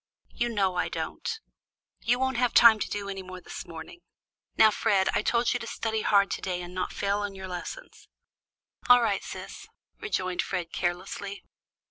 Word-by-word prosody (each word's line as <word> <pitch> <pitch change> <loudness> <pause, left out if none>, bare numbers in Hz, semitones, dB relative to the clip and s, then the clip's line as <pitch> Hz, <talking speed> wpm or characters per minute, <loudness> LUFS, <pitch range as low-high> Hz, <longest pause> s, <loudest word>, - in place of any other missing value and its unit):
"You 240 0 -1
know 195 -5 +1
I - - 0
don't. - - -4 0.7
You 245 +2 +2
won't 265 -1 0
have 245 -1 +1
time 225 -2 +8
to - - -2
do 205 -1 -3
any 195 -1 -4
more 185 0 -9
this - - -8
morning. 165 - -9 0.6
Now, 220 - +7
Fred, 200 -3 +2
I - - +2
told 235 0 +2
you 245 - -1
to 230 - -7
study 220 -1 -2
hard 200 -2 +3
to - - -2
day 180 -2 -2
and 175 +1 -9
not 185 0 -2
fail 200 +1 -1
in 205 -1 -4
your 190 0 -7
lessons." 185 - -8 0.8
"All 245 -1 +8
right 205 -4 0
sis," - - -8 0.3
rejoined 185 - -1
Fred 180 -3 -4
carelessly. 185 +3 -3
200 Hz, 180 wpm, -28 LUFS, 185-230 Hz, 0.8 s, time